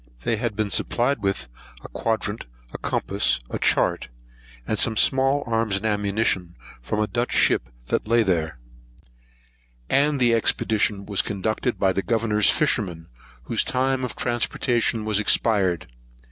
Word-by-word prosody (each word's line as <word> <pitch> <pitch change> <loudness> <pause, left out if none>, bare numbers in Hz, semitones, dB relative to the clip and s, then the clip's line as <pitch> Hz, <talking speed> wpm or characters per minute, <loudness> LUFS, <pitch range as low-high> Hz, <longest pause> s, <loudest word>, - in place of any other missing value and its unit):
They 115 - 0
had 115 -1 -3
been 105 -1 -2
supplied 125 +1 +1
with 95 -9 -1 0.4
a - - -8
quadrant, 110 - -3 0.3
a - - -6
compass, - - 0
a - - -3
chart, - - +1 0.6
and 110 - -1
some 110 -2 +3
small 135 +2 +3
arms 115 -3 0
and 100 - -6
ammunition, 100 -4 -1 0.3
from 85 - -3
a 105 - +2
Dutch 120 +3 -2
ship - - +2 0.2
that - - -1
lay 115 +1 +3
there; 80 -6 -1 1.3
and 145 +1 +2
the 120 -2 +3
expedition 105 -3 0
was 100 -1 +1
conducted 110 +4 -2
by 95 -1 +2
the 95 - -1
Governor's 110 -2 +2
fisherman, 95 - -1 0.3
whose - - +1
time 130 0 0
of 125 - -4
transportation 120 -1 0
was 105 -2 +1
expired. 100 -5 +2
110 Hz, 145 wpm, -23 LUFS, 100-120 Hz, 1.3 s, some